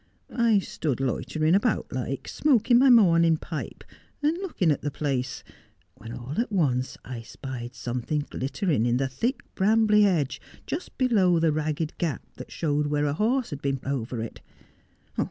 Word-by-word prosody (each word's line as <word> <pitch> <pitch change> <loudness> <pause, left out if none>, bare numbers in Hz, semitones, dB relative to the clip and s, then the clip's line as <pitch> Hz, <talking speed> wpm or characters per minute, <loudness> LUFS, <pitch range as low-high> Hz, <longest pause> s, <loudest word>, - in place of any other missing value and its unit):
I 235 -3 +4
stood 155 -8 -2
loitering 155 +5 0
about 205 +6 +1
like, - - -3
smoking 245 -4 +3
my 270 +1 +6
morning 170 -8 +6
pipe, 155 0 -6 0.4
and 305 +3 +3
looking 310 - 0
at 145 - -1
the 145 - -2
place, 135 -2 -2 0.5
when 115 - -10
all 125 - -3
at 235 - -4
once 135 -9 0
I 125 -2 -6
spied 120 0 -7
something 125 +5 -2
glittering 135 - -1
in 120 0 +2
the 135 +1 0
thick 235 - -2
brambly 210 +1 +4
hedge 165 -9 +1 0.2
just 325 - -5
below 205 -9 +3
the 165 -1 +3
ragged 155 +1 -2
gap 165 -5 -1
that - - -9
showed 150 -2 0
where 145 0 0
a 145 - 0
horse 230 - 0
had 145 -1 -5
been 135 -1 -1
over 125 -4 -2
it. 115 - -8
155 Hz, 160 wpm, -26 LUFS, 135-210 Hz, 0.5 s, my